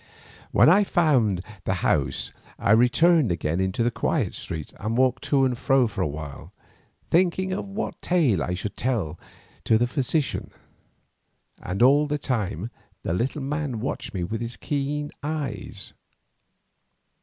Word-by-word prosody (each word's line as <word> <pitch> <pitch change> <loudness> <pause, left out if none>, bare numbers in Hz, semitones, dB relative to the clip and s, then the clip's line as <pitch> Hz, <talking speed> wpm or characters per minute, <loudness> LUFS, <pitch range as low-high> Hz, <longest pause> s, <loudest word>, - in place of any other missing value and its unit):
When - - +6
I 180 +6 +7
had 205 - +1
found 125 - +2 0.2
the - - 0
house - - +1 0.3
I - - +1
returned 125 - +5
again 80 0 -1
into 95 +4 0
the 120 - +1
quiet - - 0
street 80 -3 -5
and 110 +3 -2
walked 130 -1 +2
to 135 -2 +3
and 125 -2 0
fro 135 +3 +3
there 120 - +3
for 100 - -4
a 90 - +2
while, 75 -1 -7 0.6
thinking 185 +2 +2
of 200 - -3
what 200 +3 -5
tale 145 - +2
I 90 - -1
should 100 +3 -5
tell 110 -12 -1 0.5
to 110 - +4
the 120 - +2
physician, 135 +4 0 1.1
and 95 +6 -1
all 145 +4 +5
the 150 0 -1
time 115 - -2 0.3
the - - -1
little 130 - -1
man 140 -4 -2
watched 130 +6 -4
me 90 - -1
with 110 +6 -3
his 115 0 -4
keen 145 +1 -2
eyes. 150 -1 -4
125 Hz, 155 wpm, -25 LUFS, 100-150 Hz, 1.1 s, I